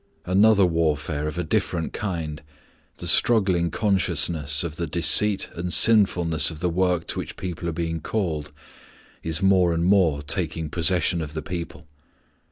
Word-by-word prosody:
Another 100 Hz, +2 st, +4 dB
warfare 75 Hz, -3 st, -1 dB
of 75 Hz, -, -6 dB
a -, -, -2 dB
different 85 Hz, -2 st, -2 dB
kind 80 Hz, -7 st, -5 dB, 0.6 s
the -, -, -7 dB
struggling 95 Hz, -7 st, +3 dB
consciousness 85 Hz, -6 st, +1 dB
of 80 Hz, -2 st, -6 dB
the 85 Hz, -, -3 dB
deceit 95 Hz, +6 st, +2 dB
and 90 Hz, +1 st, -5 dB
sinfulness 90 Hz, -7 st, +3 dB
of 80 Hz, -2 st, -9 dB
the 90 Hz, +1 st, -1 dB
work 90 Hz, -1 st, 0 dB
to -, -, -5 dB
which -, -, -7 dB
people 85 Hz, -2 st, -5 dB
are -, -, -2 dB
being 80 Hz, 0 st, -4 dB
called 80 Hz, -9 st, -3 dB, 0.7 s
is 80 Hz, +3 st, -1 dB
more 90 Hz, -3 st, +3 dB
and 85 Hz, +1 st, -1 dB
more 90 Hz, -7 st, +2 dB
taking 80 Hz, 0 st, -2 dB
possession 85 Hz, 0 st, +1 dB
of 75 Hz, 0 st, -7 dB
the 80 Hz, -, -4 dB
people. 85 Hz, -2 st, -7 dB
85 Hz, 155 wpm, -23 LUFS, 80-95 Hz, 0.7 s, Another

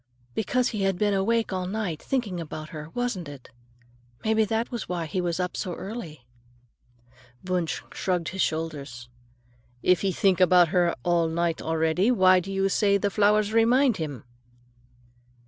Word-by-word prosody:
"Because 245 Hz, -, 0 dB
he 210 Hz, -3 st, -4 dB
had 195 Hz, -2 st, +1 dB
been 205 Hz, +1 st, +1 dB
awake 220 Hz, +2 st, +1 dB
all 185 Hz, -1 st, -2 dB
night, 190 Hz, -6 st, -3 dB
thinking 225 Hz, -10 st, -2 dB
about 155 Hz, -1 st, -7 dB
her, 155 Hz, 0 st, -8 dB
wasn't 240 Hz, -10 st, -2 dB
it? 140 Hz, -3 st, -12 dB, 0.7 s
Maybe 220 Hz, 0 st, +3 dB
that 225 Hz, +2 st, -2 dB
was 235 Hz, -4 st, -5 dB
why 175 Hz, -2 st, -2 dB
he 180 Hz, +4 st, -2 dB
was 175 Hz, 0 st, -2 dB
up 180 Hz, 0 st, -2 dB
so 180 Hz, -4 st, -3 dB
early." 170 Hz, -, -8 dB, 1.2 s
Wunsch 180 Hz, -3 st, -2 dB
shrugged 180 Hz, -3 st, -1 dB
his 190 Hz, +1 st, -3 dB
shoulders. 140 Hz, -7 st, -3 dB, 0.7 s
"If 180 Hz, -1 st, +3 dB
he 195 Hz, -, +1 dB
think 185 Hz, 0 st, +2 dB
about 180 Hz, -2 st, +6 dB
her 175 Hz, -2 st, +2 dB
all 170 Hz, -1 st, +2 dB
night 165 Hz, 0 st, -1 dB
already, 160 Hz, +5 st, +1 dB
why 185 Hz, -6 st, +5 dB
do 190 Hz, +2 st, -6 dB
you 195 Hz, 0 st, +1 dB
say 200 Hz, +1 st, +2 dB
the 200 Hz, 0 st, -1 dB
flowers 210 Hz, +1 st, +2 dB
remind 235 Hz, +2 st, +4 dB
him?" 145 Hz, -, -5 dB
185 Hz, 160 wpm, -26 LUFS, 165-210 Hz, 1.2 s, about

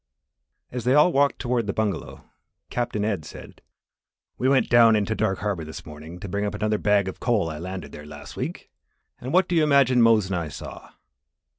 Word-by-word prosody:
As 125 Hz, -1 st, -4 dB
they 125 Hz, +2 st, +3 dB
all 150 Hz, +4 st, +6 dB
walked 140 Hz, -1 st, +2 dB
toward 120 Hz, -3 st, -1 dB
the 100 Hz, -, -1 dB
bungalow, 110 Hz, -3 st, -3 dB, 0.4 s
Captain 110 Hz, -4 st, -2 dB
Ed 100 Hz, -7 st, -1 dB
said: -, -, -12 dB, 0.8 s
"We 130 Hz, -, +2 dB
went 135 Hz, -1 st, +3 dB
down 115 Hz, -2 st, +6 dB
into 105 Hz, +1 st, 0 dB
Dark 110 Hz, -3 st, 0 dB
Harbour 100 Hz, -5 st, -2 dB
this 80 Hz, 0 st, -9 dB
morning 80 Hz, +3 st, -10 dB
to -, -, -6 dB
bring 100 Hz, +2 st, -2 dB
up 105 Hz, 0 st, -2 dB
another 105 Hz, 0 st, 0 dB
bag 105 Hz, -2 st, +2 dB
of 95 Hz, -, -6 dB
the -, -, -13 dB
coal 105 Hz, -9 st, +1 dB
I 75 Hz, -, -7 dB
landed 95 Hz, +2 st, -6 dB
there 75 Hz, 0 st, -10 dB
last 75 Hz, -1 st, -10 dB
week, -, -, -6 dB, 0.5 s
and 130 Hz, -, -6 dB
what 185 Hz, +2 st, +3 dB
do 175 Hz, -, -1 dB
you 165 Hz, -, +4 dB
imagine 140 Hz, -4 st, +4 dB
Mose 115 Hz, -3 st, +5 dB
and 95 Hz, 0 st, -3 dB
I 85 Hz, -2 st, -3 dB
saw?" 75 Hz, -, -9 dB
105 Hz, 205 wpm, -24 LUFS, 95-125 Hz, 0.8 s, all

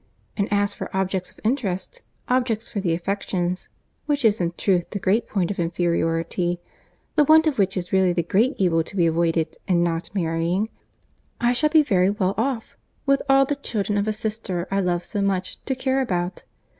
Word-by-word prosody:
And 200 Hz, -1 st, 0 dB
as 205 Hz, 0 st, +2 dB
for -, -, -6 dB
objects 190 Hz, -1 st, -1 dB
of -, -, -20 dB
interest, 230 Hz, -, -2 dB, 0.3 s
objects 245 Hz, -3 st, 0 dB
for 210 Hz, -, -4 dB
the 175 Hz, -4 st, +1 dB
affections, 180 Hz, 0 st, -2 dB, 0.4 s
which 290 Hz, -4 st, +1 dB
is 210 Hz, -3 st, +3 dB
in 170 Hz, -1 st, 0 dB
truth 180 Hz, -3 st, +1 dB
the -, -, -4 dB
great 205 Hz, +5 st, +1 dB
point 190 Hz, -3 st, 0 dB
of 195 Hz, -, -5 dB
inferiority, 170 Hz, 0 st, 0 dB, 0.6 s
the 300 Hz, -, +5 dB
want 315 Hz, +2 st, +6 dB
of 300 Hz, -7 st, 0 dB
which 195 Hz, -1 st, +2 dB
is 180 Hz, 0 st, -4 dB
really 190 Hz, -1 st, +4 dB
the 175 Hz, -1 st, 0 dB
great 225 Hz, -, +2 dB
evil 165 Hz, -4 st, +2 dB
to 195 Hz, -, -12 dB
be 175 Hz, -3 st, +3 dB
avoided 165 Hz, -1 st, +1 dB
in 175 Hz, -3 st, +3 dB
not 165 Hz, -1 st, -1 dB
marrying, 170 Hz, +4 st, 0 dB, 0.7 s
I 240 Hz, +1 st, +3 dB
shall 300 Hz, +5 st, +2 dB
be 310 Hz, 0 st, +5 dB
very 190 Hz, -8 st, +3 dB
well 200 Hz, -2 st, 0 dB
off, 235 Hz, 0 st, -2 dB, 0.3 s
with 275 Hz, -1 st, +3 dB
all 270 Hz, 0 st, +6 dB
the 290 Hz, -, -1 dB
children 210 Hz, -7 st, -2 dB
of 205 Hz, +1 st, 0 dB
a -, -, +2 dB
sister 210 Hz, -5 st, -3 dB
I 195 Hz, -, +2 dB
love 175 Hz, -2 st, 0 dB
so 200 Hz, +3 st, -3 dB
much, 190 Hz, -2 st, -1 dB
to 265 Hz, -, -1 dB
care 260 Hz, +1 st, 0 dB
about. 180 Hz, -7 st, -2 dB
195 Hz, 195 wpm, -23 LUFS, 175-230 Hz, 0.7 s, want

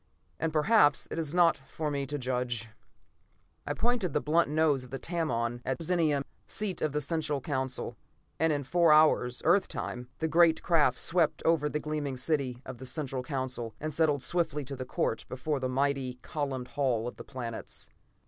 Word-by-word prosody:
And 165 Hz, 0 st, 0 dB
perhaps 155 Hz, -2 st, +4 dB
it -, -, -2 dB
is 155 Hz, -3 st, -1 dB
not 175 Hz, -1 st, +4 dB
for 155 Hz, -2 st, -3 dB
me 140 Hz, -1 st, -2 dB
to 145 Hz, +2 st, -3 dB
judge. 125 Hz, -3 st, -2 dB, 1.0 s
I -, -, -1 dB
pointed 230 Hz, -, 0 dB
the -, -, +3 dB
blunt 155 Hz, +1 st, +2 dB
nose 150 Hz, -3 st, +2 dB
of 125 Hz, -, -11 dB
the 135 Hz, -, -4 dB
Tamon 120 Hz, -8 st, -1 dB
at 130 Hz, -, -1 dB
Zenia, 160 Hz, -4 st, +1 dB, 0.2 s
seat 210 Hz, -3 st, -2 dB
of 155 Hz, -, +1 dB
the 150 Hz, -, 0 dB
Central 150 Hz, -1 st, -1 dB
Council, 130 Hz, -2 st, -3 dB, 0.4 s
and 160 Hz, +1 st, +3 dB
in 145 Hz, -1 st, 0 dB
four 170 Hz, +4 st, +4 dB
hours, 150 Hz, -5 st, +4 dB
Earth 180 Hz, +5 st, +4 dB
time, 125 Hz, 0 st, -5 dB
the 160 Hz, -, 0 dB
great 165 Hz, 0 st, +4 dB
craft 150 Hz, -7 st, +3 dB
swept 170 Hz, -3 st, +1 dB
over 160 Hz, -3 st, +3 dB
the 150 Hz, -, -1 dB
gleaming 150 Hz, -3 st, -3 dB
city 130 Hz, -2 st, -1 dB
of 130 Hz, -2 st, -8 dB
the 130 Hz, -, -6 dB
Central 135 Hz, -1 st, -3 dB
Council 125 Hz, -4 st, -4 dB
and 155 Hz, 0 st, -3 dB
settled 150 Hz, -4 st, +2 dB
swiftly 160 Hz, -5 st, -1 dB
to 135 Hz, +1 st, -6 dB
the 130 Hz, 0 st, -5 dB
court 115 Hz, -, -1 dB
before 140 Hz, +3 st, -2 dB
the 130 Hz, -1 st, -1 dB
mighty, 135 Hz, -1 st, 0 dB
columned 135 Hz, -4 st, -3 dB
Hall 125 Hz, -4 st, 0 dB
of 120 Hz, -, -7 dB
the -, -, -8 dB
Planets. 120 Hz, -3 st, -7 dB
145 Hz, 185 wpm, -30 LUFS, 130-160 Hz, 1.0 s, perhaps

